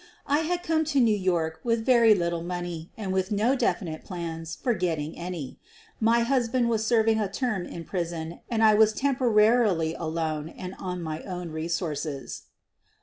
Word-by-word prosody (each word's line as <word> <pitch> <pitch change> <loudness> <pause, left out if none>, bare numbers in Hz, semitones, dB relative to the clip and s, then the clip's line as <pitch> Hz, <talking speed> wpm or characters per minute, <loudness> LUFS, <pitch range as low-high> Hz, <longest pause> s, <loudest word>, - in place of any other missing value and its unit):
I 290 +2 +2
had 350 +2 -1
come 320 -1 +1
to 290 -3 +1
New 225 -4 +4
York 170 -5 0
with 230 -1 0
very 235 -4 +6
little 170 -2 -1
money 175 -1 -5
and 195 -4 -3
with 190 +2 0
no 220 +6 +2
definite 185 - -1
plans 165 -3 -5
for 245 - 0
getting 165 -5 -2
any 170 -6 -6 0.2
— - - -28
my 235 +1 +4
husband 240 -1 +1
was 220 -2 +1
serving 225 -1 +3
a 205 -3 -1
term 215 -5 -2
in 170 - -7
prison 170 -2 -4
and 225 -2 +1
I 215 -1 +7
was 215 0 +5
temporarily 220 - +3
alone 160 -2 -3
and 185 +2 -8
on 180 -2 -4
my 155 0 -4
own 180 -3 -6
resources. 155 -3 -3
185 Hz, 170 wpm, -27 LUFS, 165-230 Hz, 0.2 s, I